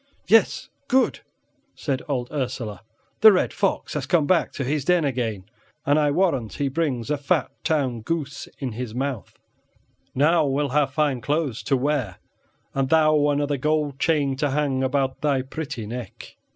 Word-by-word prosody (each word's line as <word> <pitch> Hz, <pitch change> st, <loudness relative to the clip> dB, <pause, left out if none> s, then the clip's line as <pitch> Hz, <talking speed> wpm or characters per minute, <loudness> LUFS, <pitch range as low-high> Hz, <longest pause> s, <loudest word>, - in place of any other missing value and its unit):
"Yes, 225 Hz, 0 st, +3 dB, 0.2 s
good," 260 Hz, +1 st, +2 dB, 0.6 s
said 135 Hz, -3 st, -2 dB
old 125 Hz, -3 st, -2 dB
Ursela; 125 Hz, -8 st, -4 dB, 0.4 s
"the 220 Hz, -, +9 dB
red 185 Hz, -, +1 dB
fox 195 Hz, -, -1 dB
has 140 Hz, -3 st, -3 dB
come 160 Hz, -2 st, +3 dB
back 175 Hz, +1 st, +2 dB
to 140 Hz, -, -3 dB
his 145 Hz, +2 st, -1 dB
den 175 Hz, 0 st, +3 dB
again, 115 Hz, -8 st, -2 dB, 0.4 s
and 145 Hz, +2 st, +3 dB
I 150 Hz, -1 st, +3 dB
warrant 145 Hz, -, +1 dB
he 140 Hz, -2 st, -1 dB
brings 135 Hz, -4 st, -1 dB
a 150 Hz, -, 0 dB
fat 140 Hz, -, 0 dB
town 135 Hz, -7 st, 0 dB
goose 145 Hz, +1 st, -4 dB
in 130 Hz, -3 st, -4 dB
his 115 Hz, 0 st, -6 dB
mouth; 130 Hz, -3 st, -4 dB, 0.8 s
now 160 Hz, +5 st, +4 dB
we'll 140 Hz, +1 st, 0 dB
have 140 Hz, 0 st, +1 dB
fine 140 Hz, -4 st, 0 dB
clothes 145 Hz, -2 st, -1 dB
to 135 Hz, -, +2 dB
wear, 130 Hz, -8 st, -1 dB, 0.6 s
and 135 Hz, -1 st, 0 dB
thou 155 Hz, -2 st, +4 dB
another 145 Hz, 0 st, 0 dB
gold 150 Hz, 0 st, 0 dB
chain 145 Hz, -4 st, +1 dB
to 145 Hz, +1 st, 0 dB
hang 135 Hz, -2 st, 0 dB
about 130 Hz, 0 st, 0 dB
thy 140 Hz, -3 st, +1 dB
pretty 140 Hz, -4 st, -6 dB
neck." 115 Hz, 0 st, -8 dB
140 Hz, 165 wpm, -24 LUFS, 130-150 Hz, 0.8 s, the